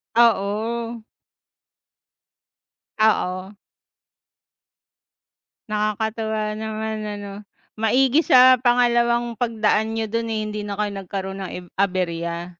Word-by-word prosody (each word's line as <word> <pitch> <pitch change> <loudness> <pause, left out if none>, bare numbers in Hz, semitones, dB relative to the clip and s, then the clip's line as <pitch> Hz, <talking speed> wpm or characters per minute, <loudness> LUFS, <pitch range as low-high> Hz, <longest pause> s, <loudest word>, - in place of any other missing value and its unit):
Oo 230 +1 +1 2.0
Oo. 190 -2 +1 2.2
Nakakatuwa 215 0 -2
naman 220 0 -4
ano. 205 -1 -6 0.5
Maigi 255 +7 +3
sa 255 0 +7
pangalawang 240 -1 +2
pagdaan 220 -2 +1
niyo 225 0 -1
dun, 230 +1 -2
eh, 220 -1 -1
hindi 210 0 -4
na 200 0 -5
kayo 210 -1 -1
nagkaroon 195 +1 -5
ng - - -6
eb 180 - -9
aberya. 175 -3 -1
220 Hz, 90 wpm, -22 LUFS, 200-235 Hz, 2.2 s, sa